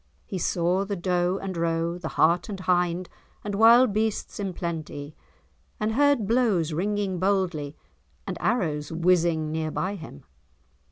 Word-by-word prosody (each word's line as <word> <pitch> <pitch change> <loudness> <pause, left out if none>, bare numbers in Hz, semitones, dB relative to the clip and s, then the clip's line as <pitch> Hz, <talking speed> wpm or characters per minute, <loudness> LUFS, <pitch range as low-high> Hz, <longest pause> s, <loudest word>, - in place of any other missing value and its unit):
He 190 - -5
saw 175 +3 +1
the 200 0 -3
doe 180 0 0
and 190 -1 -5
roe, 165 +1 -1
the 170 - -5
hart 170 +6 +3
and 195 -2 -5
hind 180 -1 +1 0.4
and 205 - -4
wild 230 +2 +6
beasts 215 0 -2
in 195 -2 -2
plenty, 155 -4 -5 0.6
and 215 +1 0
heard 285 -2 +3
blows 205 -8 +1
ringing 195 +1 -1
boldly, 180 -7 0 0.5
and - - -4
arrows 160 -11 0
whizzing 165 -2 +2
near 160 0 -2
by 185 +5 -2
him. 160 - -10
180 Hz, 145 wpm, -26 LUFS, 165-205 Hz, 0.6 s, wild